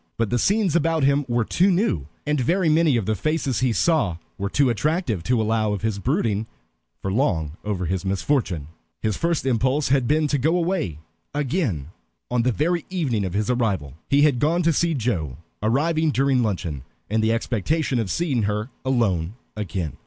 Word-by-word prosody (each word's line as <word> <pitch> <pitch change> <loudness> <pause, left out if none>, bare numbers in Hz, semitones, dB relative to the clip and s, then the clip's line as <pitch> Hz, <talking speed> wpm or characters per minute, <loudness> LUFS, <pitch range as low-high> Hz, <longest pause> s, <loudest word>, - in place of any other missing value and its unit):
But 115 -3 0
the 120 - +2
scenes 200 - +2
about 165 -2 +2
him 140 +1 +3
were 120 -2 +1
too 185 - +3
new, 175 - +1 0.2
and 150 -2 +1
very 170 +6 +2
many 155 -4 +4
of 110 - -1
the 110 - +1
faces 155 0 -1
he 130 -2 +2
saw 130 - +2 0.2
were 100 0 -3
too 140 +5 +3
attractive, 145 - 0
to 125 -2 +2
allow 110 -1 +1
of 100 - -4
his 110 -3 -1
brooding 105 +2 0 0.6
for 95 - -1
long 95 - +1
over 100 -4 -2
his 95 +2 -2
misfortune. 95 - -1 0.3
His 110 -2 +1
first 170 -4 0
impulse 130 +3 +1
had 130 -3 +2
been 155 +2 +2
to 145 - +1
go 160 +7 +2
away 170 - -1 0.4
again 135 - -1 0.4
on 125 -1 +2
the 125 +2 +2
very 165 +6 0
evening 145 - -1
of 90 -2 -3
his 105 +4 +1
arrival. 100 - -1 0.2
He 140 +1 +4
had 145 -5 +3
gone 165 +6 +2
to 165 0 +3
see 170 +1 +1
Joe, 90 - -2 0.2
arriving 155 +8 +2
during 135 -2 +2
luncheon, 90 - -2 0.3
in 110 +1 +1
the 110 +1 +2
expectation 125 - 0
of 110 -4 -2
seeing 140 - 0
her 105 +4 -3
alone 105 -9 0 0.2
again. 95 -6 -4
125 Hz, 185 wpm, -23 LUFS, 105-155 Hz, 0.6 s, many